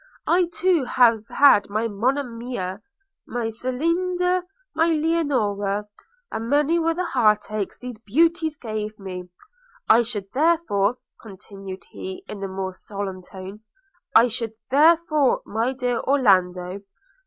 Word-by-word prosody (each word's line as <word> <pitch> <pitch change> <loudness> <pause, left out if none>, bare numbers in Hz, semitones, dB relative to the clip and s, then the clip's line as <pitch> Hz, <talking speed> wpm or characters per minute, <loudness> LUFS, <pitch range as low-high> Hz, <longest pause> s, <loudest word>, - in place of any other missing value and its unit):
I 350 0 +3
too 345 -5 +2
have 230 -3 +3
had 275 -9 +5
my 215 +3 -1
Monimia! 230 -3 -3 0.5
my 235 -2 -2
Celinda, 350 +10 0 0.3
my 325 +1 +2
Leonora; 255 -12 0 0.4
and 225 +1 -4
many 295 +4 +3
were 330 0 +1
the 365 +1 -1
heartachs 215 - +1
these 250 -3 -8
beauties 320 +7 +1
gave 215 -4 -5
me. 180 -2 -7 0.6
I 230 - +6
should, 210 -5 -4
therefore,' 260 -8 +2 0.2
continued 195 -2 -10
he, 190 0 -7
in 200 -2 -7
a - - -2
more 190 0 -4
solemn 195 0 -6
tone 190 +2 -10 0.3
– 355 -2 -41
'I 230 +2 +7
should, 230 -1 -3 0.2
therefore, 305 -1 +4
my 225 +4 -1
dear 250 -2 -1
Orlando! 185 -8 +2
230 Hz, 125 wpm, -23 LUFS, 200-305 Hz, 0.6 s, I